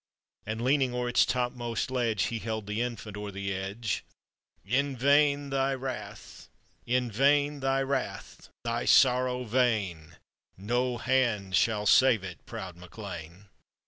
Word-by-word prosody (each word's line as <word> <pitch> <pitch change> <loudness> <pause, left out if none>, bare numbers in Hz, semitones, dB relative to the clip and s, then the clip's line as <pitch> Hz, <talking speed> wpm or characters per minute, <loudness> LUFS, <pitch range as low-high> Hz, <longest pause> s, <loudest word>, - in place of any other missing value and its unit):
And,< 110 +2 -3
leaning 130 -1 +2
o'er 125 0 -1
its 120 - +4
topmost 120 -1 -2
ledge, 115 -6 0
He 115 +2 -2
held 110 -1 -4
the 105 +3 -2
infant 115 -4 -4
o'er 105 0 -5
the 100 0 -4
edge. 100 +4 -3 0.6
"In 135 +5 0
vain 140 +2 +4
thy 135 0 +1
wrath, 120 -6 -7 0.4
thy 135 -1 0
sorrow 125 -1 +4
vain, 105 -9 0 0.4
No 120 +5 -1
hand 115 -8 +1
shall 105 0 +2
save 120 -3 +5
it, 90 -2 -8
proud 90 -2 -7
MacLean 90 -1 -9
!" - - -42
120 Hz, 120 wpm, -29 LUFS, 105-130 Hz, 0.6 s, save